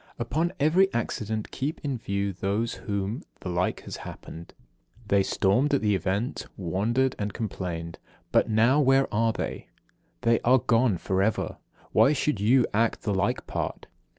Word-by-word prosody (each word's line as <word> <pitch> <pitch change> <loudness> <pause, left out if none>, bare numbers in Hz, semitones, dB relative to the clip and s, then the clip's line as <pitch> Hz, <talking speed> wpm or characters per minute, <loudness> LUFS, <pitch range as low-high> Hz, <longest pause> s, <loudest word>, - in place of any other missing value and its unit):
58. - - -7
Upon 155 +9 0
every 180 +7 +4
accident 110 -2 -2
keep 145 +4 -3
in 140 -3 -1
view 100 -4 -2
those 100 +5 -1
to - - -10
whom 100 +5 -2 0.2
the 95 - -5
like 90 +1 -1
has - - -7
happened. 85 +1 -10 0.5
They 100 -1 +4
stormed 125 +10 +2
at - - 0
the 105 -1 +2
event, 100 +5 -2
wondered 110 +9 0
and 105 0 -2
complained. 85 -6 -5 0.3
But - - +3
now 115 +6 +4
where 135 0 +4
are 115 +2 +2
they? - - -5 0.5
They 115 -1 +3
are 125 +2 +4
gone 120 -4 +2
for 95 +2 -1
ever. 105 +2 0 0.3
Why 140 - +5
should 150 -5 0
you 120 +4 +4
act 115 +2 +1
the 105 - 0
like 95 - 0
part? - - -4
110 Hz, 165 wpm, -27 LUFS, 100-130 Hz, 0.5 s, Why